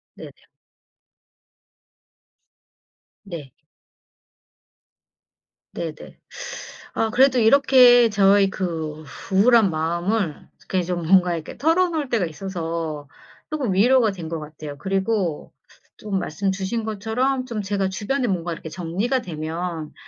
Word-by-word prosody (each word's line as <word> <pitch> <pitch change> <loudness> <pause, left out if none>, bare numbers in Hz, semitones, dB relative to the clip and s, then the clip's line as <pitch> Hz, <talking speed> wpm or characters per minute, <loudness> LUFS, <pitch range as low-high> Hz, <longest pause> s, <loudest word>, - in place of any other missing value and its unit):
네. - - -10 2.9
네. 165 -9 -8 2.2
네네. 160 -2 -7 0.8
아 225 - +1
그래도 260 +1 +4
이렇게 245 0 +6
저의 200 -1 +4
그 160 -5 -4 0.3
우울한 215 +2 +5
마음을 170 +3 -2
이렇게 185 -1 -2
좀 175 -1 -3
뭔가 180 -1 +4
이렇게 160 -1 -8
털어놓을 325 -2 +1
때가 225 -7 +1
있어서 165 -3 -5 0.4
쪼끔 270 -10 -1
위로가 230 +3 +4
된 175 -4 -7
것 165 -1 -3
같아요. 150 -1 -9
그리고 195 -4 -1 0.4
좀 200 -3 -3
말씀 190 +4 -2
주신 195 +4 -3
것처럼 230 +5 -1
좀 230 -4 -4
제가 195 -1 -1
주변에 245 +7 -2
뭔가 175 -4 -2
이렇게 165 - -9
정리가 190 - -2
되면 165 -2 -5
195 Hz, 225 characters per minute, -22 LUFS, 165-230 Hz, 2.9 s, 이렇게